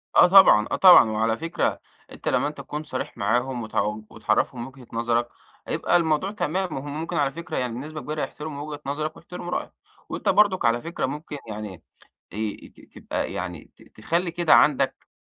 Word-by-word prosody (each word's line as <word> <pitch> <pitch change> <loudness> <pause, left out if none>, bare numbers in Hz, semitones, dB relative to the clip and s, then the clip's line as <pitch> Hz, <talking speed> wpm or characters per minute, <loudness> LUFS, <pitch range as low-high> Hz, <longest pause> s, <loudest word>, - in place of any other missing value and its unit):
آه - - +8
طبعًا، 180 - +7
آه - - +2
طبعًا 175 - +8
وعلى 110 +1 0
فكرة 165 +1 -1 0.3
أنت - - -10
لمَّا 145 - +2
أنت 150 - -7
تكون 150 +1 -6
صريح 130 -4 -5
معاهم 120 +4 0
وت 110 - -10 0.3
وتعرفهم 115 +3 -1
وجهة 130 -2 -14
نظرك 120 +1 0 0.4
هيبقى - - +2
الموضوع 160 +3 0
تمام، 190 -2 -2
وهم 145 +3 -5
ممكن 165 - -4
على 140 -2 +2
فكرة 165 +3 -6
يعني 125 -2 -2
بنسبة 155 +5 -6
كبيرة 150 0 -4
يحترموا 150 -1 -5
وجهة 145 -1 -7
نظرك 155 +3 -3
ويحترموا 175 0 -8
رأيك، - - -3 0.4
وأنت - - -2
برضك 205 -3 +3
على 115 +1 +2
فكرة 165 +5 -3
ممكن 150 0 -6
يعني 105 -5 -7 0.5
ي 105 0 -4
ت - - -22 0.2
تبقى - - -4
يعني 90 -3 -6
ت - - -23 0.2
تخلّي 170 +10 -1
كده 170 -1 +3
عندك 135 -2 +3
145 Hz, 180 wpm, -24 LUFS, 115-165 Hz, 0.5 s, آه